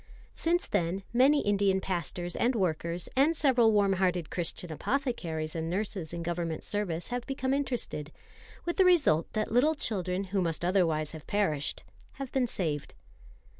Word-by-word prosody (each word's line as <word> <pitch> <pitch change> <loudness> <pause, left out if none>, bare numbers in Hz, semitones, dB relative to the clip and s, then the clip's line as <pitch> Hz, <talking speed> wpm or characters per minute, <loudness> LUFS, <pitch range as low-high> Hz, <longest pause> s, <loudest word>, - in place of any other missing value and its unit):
Since 345 +2 0
then 190 0 0
many 275 +4 +5
Indian 200 -2 +2
pastors 175 -1 -3
and 245 +2 +2
workers, 170 -3 -1
and 295 +5 +3
several 245 -7 +4
warm 200 -2 +3
hearted 180 -3 0
Christian 175 0 -4
apothecaries 165 - -2
and 165 0 -2
nurses 190 -3 -2
in 170 0 -4
Government 170 -1 -2
service, 180 -5 -2
have 245 0 -3
become 265 -1 -1
interested; 245 - -2 0.5
with 345 - -2
the 380 - +6
result 300 - +4
that 215 -1 -1
little 280 +7 +4
children 185 - -1
who 195 - +2
must 170 -1 -1
otherwise 165 -5 +2
have 155 -2 -10
perished 155 -9 0 0.3
have 270 -2 -6
been 260 -2 +1
saved. 155 -9 -3
190 Hz, 155 wpm, -30 LUFS, 170-245 Hz, 0.5 s, the